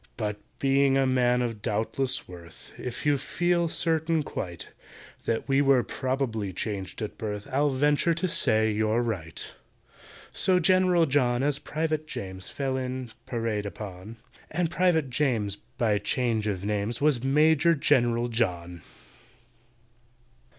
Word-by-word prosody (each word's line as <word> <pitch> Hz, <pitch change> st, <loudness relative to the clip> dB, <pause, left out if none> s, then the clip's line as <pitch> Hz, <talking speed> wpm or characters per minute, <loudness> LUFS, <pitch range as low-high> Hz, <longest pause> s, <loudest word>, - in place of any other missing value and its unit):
"But, 105 Hz, -2 st, -2 dB, 0.2 s
being 135 Hz, 0 st, +3 dB
a 135 Hz, -, +3 dB
man 125 Hz, -1 st, +2 dB
of 115 Hz, -3 st, -4 dB
doubtless 115 Hz, +5 st, -1 dB
worth, 85 Hz, -2 st, -12 dB
If 125 Hz, +2 st, -6 dB
you 145 Hz, -2 st, +3 dB
feel 175 Hz, +4 st, +1 dB
certain 160 Hz, -1 st, 0 dB
quite 85 Hz, -, -6 dB, 0.6 s
That 115 Hz, -1 st, -1 dB
we 135 Hz, 0 st, +3 dB
were 135 Hz, -3 st, +4 dB
probably 130 Hz, -6 st, -2 dB
changed 100 Hz, +2 st, -4 dB
at 105 Hz, -, -6 dB
birth, 105 Hz, -2 st, -4 dB
I'll 145 Hz, +3 st, +2 dB
venture 145 Hz, +5 st, +2 dB
to 185 Hz, +3 st, -1 dB
say 110 Hz, -9 st, +3 dB
you're 110 Hz, +2 st, +1 dB
right." 90 Hz, -9 st, -4 dB, 0.8 s
So 185 Hz, -2 st, +2 dB
GENERAL 180 Hz, -1 st, +4 dB
JOHN 130 Hz, -3 st, +2 dB
as 145 Hz, 0 st, +1 dB
PRIVATE 155 Hz, 0 st, -2 dB
JAMES 95 Hz, -7 st, -6 dB
Fell 135 Hz, -2 st, -2 dB
in, 130 Hz, -2 st, -4 dB, 0.2 s
parade 115 Hz, -4 st, -2 dB
upon; 100 Hz, +2 st, -8 dB, 0.3 s
And 170 Hz, +1 st, -1 dB
PRIVATE 170 Hz, -7 st, +2 dB
JAMES, 115 Hz, -8 st, 0 dB, 0.2 s
by 105 Hz, -3 st, +2 dB
change 110 Hz, 0 st, 0 dB
of 100 Hz, -2 st, -2 dB
names, 105 Hz, +2 st, -1 dB
Was 140 Hz, -4 st, +2 dB
MAJOR 155 Hz, +4 st, +4 dB
GENERAL 120 Hz, -5 st, +2 dB
JOHN. 90 Hz, -7 st, -2 dB
125 Hz, 135 wpm, -27 LUFS, 105-145 Hz, 0.8 s, were